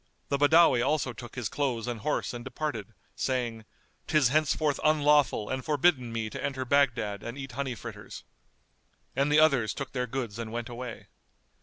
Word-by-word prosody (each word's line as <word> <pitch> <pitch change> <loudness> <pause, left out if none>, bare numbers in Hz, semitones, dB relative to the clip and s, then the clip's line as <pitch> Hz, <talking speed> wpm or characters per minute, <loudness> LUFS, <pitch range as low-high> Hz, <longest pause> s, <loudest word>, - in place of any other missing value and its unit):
The 140 - 0
Badawi 145 -3 +6
also 135 -2 0
took 120 +1 -10
his 125 -4 -2
clothes 125 -5 -1
and 120 -2 -3
horse 145 +3 -1
and 120 -1 -6
departed, 125 -6 -4 0.2
saying, 120 -4 -2 0.4
"'Tis 150 -6 +4
henceforth 150 0 +1
unlawful 145 -7 +3
and 130 0 -3
forbidden 145 -4 +2
me 115 -1 -2
to - - -6
enter 130 -2 -2
Baghdad 120 -7 +1
and 120 +3 -6
eat 135 -1 -6
honey 130 0 -3
fritters." - - -9 0.9
And 140 +2 +1
the 150 - +6
others 140 -8 +3
took 140 - -5
their 125 -1 -2
goods 115 -4 -4
and 115 -1 -5
went 115 0 -4
away. 120 -1 -7
130 Hz, 170 wpm, -28 LUFS, 120-145 Hz, 0.9 s, Badawi